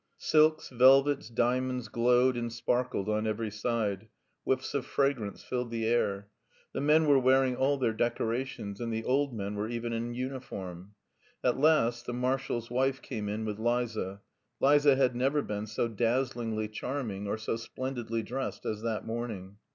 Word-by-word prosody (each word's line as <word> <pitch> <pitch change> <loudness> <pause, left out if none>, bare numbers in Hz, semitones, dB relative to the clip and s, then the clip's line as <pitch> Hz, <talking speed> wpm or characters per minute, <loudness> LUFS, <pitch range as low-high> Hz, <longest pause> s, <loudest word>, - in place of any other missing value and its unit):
Silks, 155 0 +3
velvets, 135 +3 +5
diamonds 125 +1 0
glowed 125 +3 +3
and 120 -1 -3
sparkled 120 -3 -1
on 110 +1 0
every 110 0 -2
side; 105 -2 -2 0.4
whiffs 130 0 -1
of 140 -3 0
fragrance 135 -9 -1
filled 125 -1 -3
the 115 -1 -2
air. 100 -4 +1 0.5
The - - -2
men 155 +2 +4
were 145 -2 +5
wearing 130 0 +3
all 135 +3 +2
their 120 -4 +1
decorations, 115 -2 -2
and 115 -1 -2
the 110 0 -2
old 140 +3 +1
men 100 -3 -4
were 105 +1 -2
even 120 0 -3
in 120 +1 -3
uniform. 105 -8 -6 0.5
At 125 +1 +2
last 120 -6 +3
the 120 - -2
marshal's 125 -2 -1
wife 130 +2 +1
came 105 -5 -4
in 110 +2 -3
with 105 -1 -4
Liza. 110 -4 -1 0.4
Liza 145 0 +5
had 130 -2 +2
never 135 +4 +1
been 105 0 -4
so 110 +2 -1
dazzlingly 115 -1 -1
charming 110 -3 -4
or 105 - -1
so 110 +1 -2
splendidly 115 -1 -4
dressed 130 +3 -4
as 110 -1 -2
that 115 -1 -2
morning. 110 -4 -5
120 Hz, 160 wpm, -30 LUFS, 110-130 Hz, 0.5 s, velvets